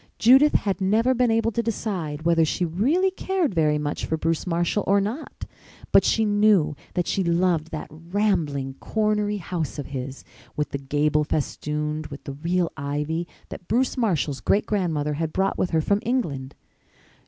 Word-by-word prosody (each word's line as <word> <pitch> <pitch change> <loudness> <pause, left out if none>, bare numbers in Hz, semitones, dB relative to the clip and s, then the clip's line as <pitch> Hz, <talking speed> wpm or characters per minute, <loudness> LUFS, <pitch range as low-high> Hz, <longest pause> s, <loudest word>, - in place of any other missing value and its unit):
Judith 265 +6 +6
had 195 -2 0
never 220 +7 +3
been 250 -1 +2
able 225 0 +2
to 235 - 0
decide 185 -9 -3
whether 165 -1 +4
she 165 +3 0
really 275 - +1
cared 375 - -1
very 155 -3 +2
much 150 0 -3
for 160 - -1
Bruce 165 +2 -1
Marshall 175 +4 0
or 200 +1 +4
not, 220 +10 -4 0.5
but - - +6
she 225 - +2
knew 205 -7 +3 0.2
that 175 - +1
she 195 - 0
loved 170 -2 +1
that 155 -2 -5
rambling, 160 -5 -1
cornery 210 -1 0
house 170 -5 -4
of 145 - -4
his, 130 0 -5 0.3
with 150 - -1
the 140 - -3
gable 150 +2 +1
festooned 150 +1 -2
with 140 0 -10
the 140 - -6
real 170 +4 -1
ivy 150 +4 -2 0.2
that 175 - -9
Bruce 245 +5 +1
Marshall's 165 - 0
great 205 - +2
grandmother 160 -8 -1
had 160 +1 -2
brought 190 +3 0
with 180 - +1
her 160 -2 +2
from 200 +6 +1
England. 150 - -2
170 Hz, 170 wpm, -24 LUFS, 150-210 Hz, 0.5 s, Judith